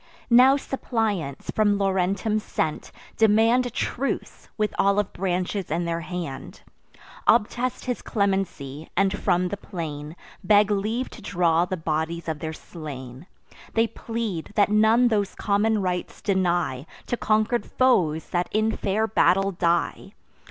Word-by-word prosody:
Now 255 +3 +7
suppliants, 220 - -2
from 205 -2 +2
Laurentum 195 +2 0
sent, 160 -6 -3 0.3
demand 225 +3 +4
A - - -4
truce, 250 +3 -3
with 215 -1 0
olive 200 0 +2
branches 185 +1 -2
in 170 +3 -1
their 170 0 -2
hand; 165 -7 -6 0.7
Obtest 240 +3 +2
his 250 -2 -2
clemency, 190 - -2
and 195 +1 +3
from 180 -1 +1
the 205 - -4
plain 155 -5 -6 0.3
Beg 205 +1 +4
leave 215 +5 -1
to 230 - -11
draw 175 -4 +2
the 185 +1 -3
bodies 160 +1 -2
of 160 -2 -3
their 160 -1 -4
slain. 145 -3 -9 0.5
They 225 0 +4
plead, 225 -6 -5
that 205 -2 +4
none 220 +3 +4
those 205 -3 0
common 210 0 +1
rites 180 -1 -3
deny 175 -8 0 0.2
To - - -1
conquer'd 220 +1 +1
foes 170 -12 +2
that 175 0 0
in 220 +1 +1
fair 210 +3 0
battle 195 -2 +3
die. 175 -1 -1
195 Hz, 135 wpm, -24 LUFS, 170-220 Hz, 0.7 s, Now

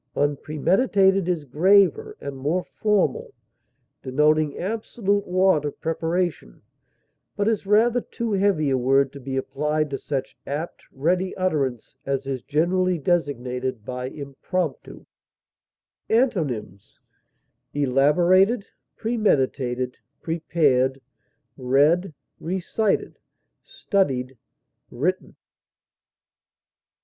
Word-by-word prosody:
Unpremeditated 185 - +2
is 165 -5 -1
graver 200 - +3
and 140 - -6
more 150 +7 -1
formal, 205 -10 -1 0.7
denoting 150 +3 +2
absolute 205 0 -2
want 185 -4 +3
of 145 - -5
preparation, 165 - -2 0.7
but 205 - 0
is 215 -3 0
rather 230 +4 +4
too 235 -1 -4
heavy 190 -8 +2
a 130 - +2
word 135 +2 +2
to 140 - -9
be 135 0 -4
applied 150 +2 -1
to 135 - -3
such 135 -3 -4
apt, 150 +5 -4
ready 180 +7 -1
utterance 140 - -1
as 135 -1 -2
is 135 -2 -3
generally 180 +5 +1
designated 130 - -2
by 125 0 -4
impromptu. 140 +3 -5 1.0
Antonyms: 150 - -1 0.7
elaborated, 175 - +3 0.3
premeditated, 130 - 0 0.2
prepared, 145 -5 +1 0.6
read, 145 +8 +2 0.3
recited, 190 +4 -1 0.4
studied, 140 - -1 0.5
written. 175 +10 -2
155 Hz, 90 wpm, -24 LUFS, 135-190 Hz, 1.0 s, rather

